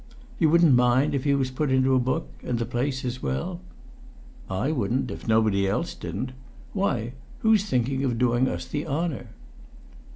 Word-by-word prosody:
"You 160 Hz, -, +4 dB
wouldn't 170 Hz, -2 st, +5 dB
mind 125 Hz, +4 st, +3 dB
if 140 Hz, -1 st, -1 dB
he 140 Hz, -1 st, +3 dB
was 130 Hz, -2 st, 0 dB
put 140 Hz, +2 st, -1 dB
into 130 Hz, 0 st, +3 dB
a 130 Hz, -, +4 dB
book 130 Hz, +6 st, -1 dB, 0.2 s
and 120 Hz, -, -1 dB
the 115 Hz, -, -1 dB
place 130 Hz, +3 st, -2 dB
as 125 Hz, +1 st, -3 dB
well?" 175 Hz, +6 st, -3 dB, 0.9 s
"I 100 Hz, +10 st, 0 dB
wouldn't, 125 Hz, -2 st, -1 dB
if -, -, -8 dB
nobody 110 Hz, -3 st, +3 dB
else 95 Hz, -, -1 dB
didn't! 130 Hz, -, -5 dB, 0.4 s
Why? 125 Hz, -, -1 dB, 0.3 s
Who's 220 Hz, -2 st, +4 dB
thinking 130 Hz, -, 0 dB
of 125 Hz, -4 st, 0 dB
doing 125 Hz, +1 st, +2 dB
us -, -, -3 dB
the 145 Hz, 0 st, -4 dB
honour?" 150 Hz, -4 st, -2 dB
130 Hz, 170 wpm, -25 LUFS, 120-150 Hz, 0.9 s, wouldn't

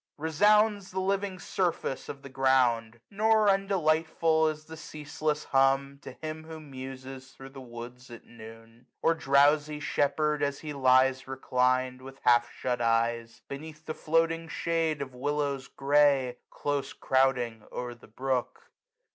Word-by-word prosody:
280 160 Hz, +2 st, -4 dB
Resounds 210 Hz, +2 st, +4 dB
the 190 Hz, -, -2 dB
living 195 Hz, 0 st, -1 dB
surface 180 Hz, -7 st, -2 dB
of 140 Hz, 0 st, -8 dB
the 140 Hz, -, -9 dB
ground: 125 Hz, -4 st, +2 dB
Nor 215 Hz, +1 st, +3 dB
undelightful 165 Hz, -4 st, +2 dB
is 155 Hz, 0 st, -4 dB
the 160 Hz, -, -9 dB
ceaseless 150 Hz, -1 st, -4 dB
hum, 135 Hz, +1 st, +2 dB
To -, -, -9 dB
him 155 Hz, 0 st, -7 dB
who 160 Hz, 0 st, -8 dB
muses 130 Hz, -2 st, -9 dB
thro' 135 Hz, 0 st, -11 dB
the 135 Hz, 0 st, -11 dB
woods 120 Hz, +1 st, -10 dB
at 120 Hz, -1 st, -11 dB
noon 115 Hz, 0 st, -13 dB
j 120 Hz, -, -28 dB, 0.2 s
Or 165 Hz, -, +4 dB
drowsy 145 Hz, 0 st, +3 dB
shepherd, 150 Hz, +1 st, 0 dB
as 140 Hz, -1 st, -1 dB
he 150 Hz, -2 st, -5 dB
lies 130 Hz, -1 st, +3 dB
reclin'd. 130 Hz, -1 st, 0 dB
With 135 Hz, +1 st, -11 dB
half 120 Hz, -1 st, +4 dB
shut 125 Hz, -1 st, -3 dB
eyes, 115 Hz, 0 st, 0 dB
beneath 155 Hz, +2 st, -9 dB
the 155 Hz, -, -3 dB
floating 165 Hz, +1 st, 0 dB
shade 165 Hz, -1 st, -1 dB
285 140 Hz, -, -3 dB
Of 125 Hz, -1 st, -15 dB
willows 145 Hz, -1 st, -1 dB
grey, 140 Hz, -3 st, +2 dB
close 145 Hz, -1 st, -3 dB
crouding 125 Hz, -4 st, +1 dB
o'er 125 Hz, 0 st, -5 dB
the 120 Hz, -, -17 dB
brook. 130 Hz, +2 st, -3 dB
140 Hz, 150 wpm, -28 LUFS, 130-160 Hz, 0.2 s, Resounds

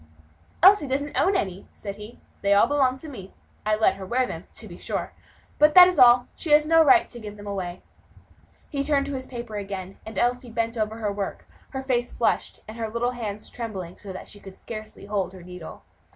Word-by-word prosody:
"Elsie 385 Hz, -5 st, +7 dB
doesn't 280 Hz, +2 st, -2 dB
own 385 Hz, +2 st, +3 dB
any," 190 Hz, -, -2 dB
said 200 Hz, -2 st, -7 dB
he; 210 Hz, +3 st, -11 dB, 0.2 s
"they 200 Hz, 0 st, +3 dB
all 200 Hz, -, +6 dB
belong 265 Hz, -3 st, +2 dB
to 315 Hz, -, -8 dB
me. 195 Hz, -10 st, -10 dB, 0.3 s
I 215 Hz, -, +3 dB
let 215 Hz, -3 st, +2 dB
her 195 Hz, -, -7 dB
wear 255 Hz, +4 st, +1 dB
them, -, -, -7 dB
to -, -, -7 dB
be -, -, -10 dB
sure, -, -, -3 dB, 0.5 s
but 300 Hz, 0 st, +5 dB
that 360 Hz, -1 st, +11 dB
is 365 Hz, -, 0 dB
all; 245 Hz, 0 st, +7 dB
she 330 Hz, -, -5 dB
has 300 Hz, 0 st, +6 dB
no 325 Hz, +1 st, +6 dB
right 345 Hz, +4 st, +5 dB
to 240 Hz, -, -8 dB
give 210 Hz, -2 st, -8 dB
them 205 Hz, -, -11 dB
away." 185 Hz, -3 st, -5 dB, 0.9 s
He 275 Hz, -1 st, -1 dB
turned 280 Hz, -1 st, +1 dB
to 285 Hz, -, -4 dB
his 260 Hz, -1 st, -5 dB
paper 235 Hz, -4 st, -6 dB
again, 195 Hz, -2 st, -6 dB
and 220 Hz, -2 st, -9 dB
Elsie 245 Hz, +2 st, 0 dB
bent 230 Hz, 0 st, -2 dB
over 215 Hz, -1 st, -1 dB
her 215 Hz, -2 st, -2 dB
work, 200 Hz, -1 st, -5 dB, 0.2 s
her 265 Hz, -1 st, -5 dB
face 245 Hz, -2 st, 0 dB
flushed, -, -, -1 dB
and 215 Hz, +2 st, -9 dB
her 225 Hz, -1 st, -3 dB
little 235 Hz, +2 st, -1 dB
hand 215 Hz, -4 st, -5 dB
trembling 195 Hz, -7 st, -6 dB
so 200 Hz, -, -9 dB
that 185 Hz, -, -8 dB
she 205 Hz, -, -12 dB
could 195 Hz, -1 st, -12 dB
scarcely 215 Hz, -2 st, -9 dB
hold 200 Hz, -2 st, -2 dB
her 185 Hz, -2 st, -11 dB
needle. 180 Hz, -2 st, -10 dB
225 Hz, 220 wpm, -25 LUFS, 200-265 Hz, 0.9 s, that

